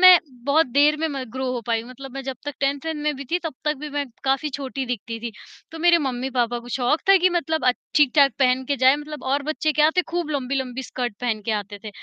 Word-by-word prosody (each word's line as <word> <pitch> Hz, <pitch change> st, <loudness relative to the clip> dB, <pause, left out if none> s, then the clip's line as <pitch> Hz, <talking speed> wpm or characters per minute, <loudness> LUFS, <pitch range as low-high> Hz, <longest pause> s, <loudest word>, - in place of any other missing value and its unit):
मैं 370 Hz, -1 st, +10 dB, 0.3 s
बहुत 300 Hz, +4 st, +4 dB
देर 290 Hz, +4 st, +4 dB
में 320 Hz, -, +1 dB
म 275 Hz, -3 st, -4 dB
ग्रो 260 Hz, -1 st, -2 dB
हो 245 Hz, -, -2 dB
पाई 230 Hz, -1 st, 0 dB
मतलब 260 Hz, +2 st, -10 dB
मैं 270 Hz, -, -4 dB
जब 265 Hz, -1 st, -5 dB
तक 290 Hz, -1 st, -4 dB
10th 275 Hz, 0 st, +1 dB
वेंथ 320 Hz, -, -1 dB
में 300 Hz, 0 st, 0 dB
भी 275 Hz, -, -7 dB
थी, 350 Hz, -, +2 dB
तब 315 Hz, -4 st, -3 dB
तक 300 Hz, -1 st, +1 dB
भी 300 Hz, +2 st, -6 dB
मैं 290 Hz, 0 st, -1 dB, 0.2 s
काफ़ी 270 Hz, +3 st, +1 dB
छोटी 270 Hz, -1 st, -4 dB
दिखती 230 Hz, -1 st, -4 dB
थी। 235 Hz, -, -4 dB, 0.4 s
तो 325 Hz, -, -7 dB
मेरे 345 Hz, 0 st, +5 dB
मम्मी-पापा 250 Hz, -3 st, -1 dB
को 240 Hz, +1 st, -11 dB
शौक़ 250 Hz, +5 st, +1 dB
था 390 Hz, -, +8 dB
कि 365 Hz, +1 st, +4 dB
मतलब 320 Hz, -2 st, -1 dB
अच्छ 250 Hz, -, +4 dB, 0.2 s
ठीक-ठाक 280 Hz, -1 st, +5 dB
पहन 260 Hz, 0 st, +3 dB
के 280 Hz, +2 st, -1 dB
जाए 260 Hz, +2 st, +5 dB
मतलब 300 Hz, 0 st, -8 dB
और 280 Hz, +2 st, +1 dB
बच्चे 310 Hz, +1 st, -1 dB
क्या 300 Hz, 0 st, +4 dB
आते 360 Hz, +4 st, +2 dB
खूब 340 Hz, -2 st, -2 dB
लंबी-लंबी 265 Hz, -2 st, -2 dB
स्कर्ट 245 Hz, -3 st, -4 dB
पहन 230 Hz, -3 st, -1 dB
के 225 Hz, -, -1 dB
आते 205 Hz, -1 st, -4 dB
थे, -, -, -5 dB
275 Hz, 250 wpm, -23 LUFS, 250-300 Hz, 0.4 s, मैं